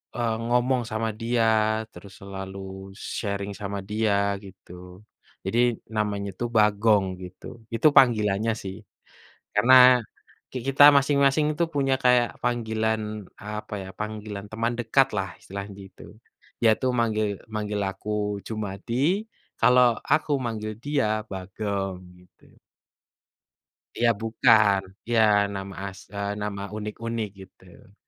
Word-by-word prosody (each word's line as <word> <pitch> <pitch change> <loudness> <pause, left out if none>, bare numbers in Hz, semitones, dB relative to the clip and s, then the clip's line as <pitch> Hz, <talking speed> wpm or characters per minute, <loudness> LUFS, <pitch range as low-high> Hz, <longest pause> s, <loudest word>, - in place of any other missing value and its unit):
eee, 115 -2 0
ngomong 125 +1 +2
sama 110 +1 -1
dia, 115 +1 +1 0.4
terus 100 -2 -13
selalu 95 0 -8 0.2
sharing 100 -1 -3
sama 100 0 -3
dia 100 0 0
gitu. 90 -1 -13 0.5
Jadi, 115 +5 +1 0.4
namanya 100 -2 -1
itu 120 - -3
Bagong 105 -2 +3 0.2
gitu. 95 +6 -11
Itu 115 +6 +4
panggilannya 110 -5 +4
sih. 95 -1 -6 0.8
Karena 125 +3 +7 0.5
ki 130 - -4
kita 135 +1 +5
masing-masing 140 +1 +3
itu 170 - +1
punya 135 -2 +2
kayak 125 -1 +3
panggilan, 110 -2 0 0.4
apa 105 +1 -6
ya, 95 - -9
panggilan 105 -1 -6
teman 115 +2 -1
dekatlah, 115 -4 +1
istilahnya 100 +1 -7 0.2
gitu. 95 - -16 0.6
Dia 115 -2 +5
tuh 130 -1 +1
manggil 110 -3 0 0.2
manggil 105 -1 -2
aku 105 0 -3
Jumadi, 115 - -1 0.4
kalau 125 -1 +5 0.2
aku 155 0 +1
manggil 110 -2 -4
dia 110 -7 0
Bagong 95 0 -4 0.2
gitu. 90 0 -24 1.4
Ya, 120 0 +3
bukan. 110 -3 +4 0.2
Ya 120 -1 +2 0.3
nama 95 0 -6 0.2
as 95 - -13
eee, 100 0 -3
nama 100 -1 -4
unik-unik, 110 +1 -4 0.2
gitu. 95 +1 -20
110 Hz, 115 wpm, -25 LUFS, 100-120 Hz, 1.4 s, Karena